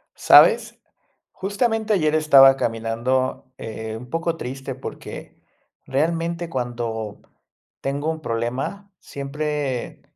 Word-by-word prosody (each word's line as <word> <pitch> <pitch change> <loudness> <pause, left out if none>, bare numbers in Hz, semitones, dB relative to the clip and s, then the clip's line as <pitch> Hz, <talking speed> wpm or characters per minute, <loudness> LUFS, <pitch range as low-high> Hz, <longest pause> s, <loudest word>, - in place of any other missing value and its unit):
¿Sabes? 475 -1 +5 0.5
Justamente 220 +2 -1
ayer 155 -6 +2
estaba 135 -4 +7
caminando, 120 +3 -1
eh, 110 0 -6
un 125 +2 -11
poco 165 +1 -2
triste 135 0 -6
porque, 135 - -9 0.4
realmente, 165 +4 -1
cuando 120 -5 -4 0.6
tengo 145 +3 -1
un 160 - -7
problema 130 - -3
siempre 140 -2 -4
135 Hz, 95 wpm, -22 LUFS, 120-165 Hz, 0.6 s, estaba